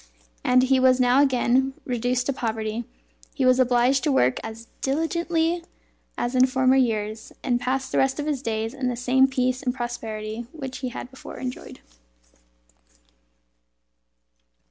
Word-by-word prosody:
As 255 0 +4
he 260 0 +3
was 255 0 +4
now 250 +2 +5
again 265 0 +2
reduced 250 0 -1
to 275 - 0
poverty, 225 -1 -3 0.5
he 265 - +1
was 255 0 +5
obliged 250 +1 +3
to 300 - +2
work 125 - +2
as 225 +1 -8
diligently 330 +3 0 0.5
as 240 +1 -2
in 255 0 +5
former 260 0 +3
years, 220 -4 0
and 245 -2 0
passed 265 +1 -1
the - - +1
rest 265 +2 +1
of 295 - -2
his 295 -4 -1
days 225 -1 -2
in 265 -2 -3
the 245 - -1
same 255 +2 +3
peace 255 -1 0
and 250 -2 -2
prosperity 225 -2 -5
which 270 -5 -6
he 255 - -3
had 245 +1 -8
before 265 - -10
enjoyed. 255 -1 -7
255 Hz, 150 wpm, -24 LUFS, 240-265 Hz, 0.5 s, now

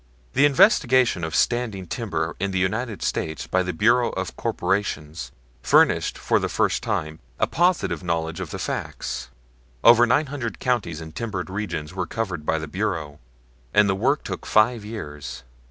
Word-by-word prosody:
The 140 +3 +5
investigation 130 - +4
of 80 -1 -3
standing 115 -5 0
timber 85 -5 -3
in 100 +2 -1
the 95 - -2
United 105 +2 -1
States 80 -3 -2
by 95 - +1
the 90 0 -2
Bureau 115 +8 +3
of - - -4
Corporations 90 -5 -2 0.3
furnished - - +3
for - - +1
the - - -2
first - - +1
time 80 0 -2 0.2
a - - +4
positive 175 - +1
knowledge 80 -1 -2
of - - -5
the - - -5
facts. - - -4 0.5
Over 120 +1 +7
nine 145 +6 +3
hundred 135 -5 -5
counties 105 -11 -1
in 80 0 -8
timbered 95 -1 -4
regions 90 -6 -4
were 95 -2 -3
covered 90 -9 -4
by 80 - +2
the 80 0 -5
Bureau, 80 -5 -3 0.6
and 105 0 +6
the 95 - +2
work 95 - +1
took - - -6
five 110 +1 +3
years. 75 - -7
95 Hz, 165 wpm, -24 LUFS, 80-115 Hz, 0.6 s, Over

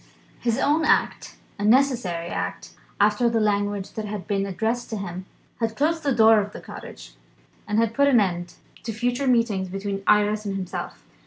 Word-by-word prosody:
His 235 -1 0
own 300 +4 +2
act 310 - +1 0.2
(a - - -3
necessary 215 -8 +2
act 90 - -4 0.3
after 210 +4 +3
the 230 -1 +1
language 205 -2 0
that 220 - -4
had 205 -2 -5
been 200 -2 -1
addressed 225 +5 -2
to 220 - -3
him) 185 -1 -6 0.3
had 225 -1 -1
closed 320 +3 +1
the 285 - 0
doors 220 -3 +5
of - - -16
the - - -7
cottage, - - -11 0.5
and 210 - -1
had 225 0 +2
put 280 +3 +3
an 260 -4 +5
end 175 -3 -2 0.3
to 225 - -5
future 245 +4 -1
meetings 230 -7 +1
between 195 +1 -4
Iris 210 0 +3
and 200 -2 -3
himself. 185 -2 -6
210 Hz, 180 wpm, -24 LUFS, 195-235 Hz, 0.5 s, doors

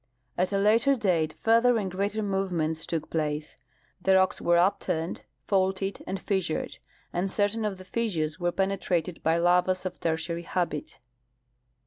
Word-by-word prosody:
At 180 +2 0
a 200 - +1
later 225 +7 +4
date 175 -9 +1
further 230 +2 +5
and 195 -4 -2
greater 200 +3 -1
movements 180 -5 -1
took 160 -2 -3
place, 150 -1 -2 0.5
the 190 +1 +4
rocks 190 -1 +3
were 175 - +3
uj)turned, 170 -2 0 0.2
faulted, 195 0 0
and 190 - -3
fissured, 190 -5 -2 0.3
and 180 +3 0
certain 205 +3 0
of 200 -3 -2
the 185 - -12
fissures 175 -9 -1
Avere 175 -1 -1
penetrated 185 -3 -1
by 165 +1 +2
lavas 180 +2 +2
of 180 -1 -4
Tertiary 165 +1 -1
habit. 170 -4 -3
185 Hz, 145 wpm, -27 LUFS, 170-195 Hz, 0.5 s, further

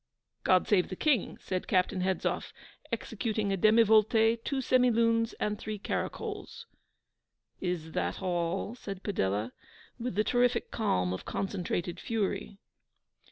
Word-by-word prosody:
'God 185 -1 +4
save 190 -4 +3
the 185 - -4
King!' 270 - +1
said 185 -1 -3
Captain 185 0 +2
Hedzoff, 185 0 -1 0.4
executing 215 -3 -1
a - - +2
demivolte, 220 +2 +4
two 280 - -2
semilunes, 230 -3 +3
and 210 0 -1
three 215 0 -4
caracols. 200 - -4 0.9
'Is 175 -3 -3
that - - -2
all?' 180 +2 -1
said 195 -6 -7
Padella, 105 - -1 0.5
with 240 -4 -3
the 210 - +3
terrific 245 +2 +1
calm 90 - 0
of 95 - -6
concentrated 180 -3 -3
fury. 205 -2 -2
205 Hz, 120 wpm, -30 LUFS, 180-230 Hz, 0.9 s, God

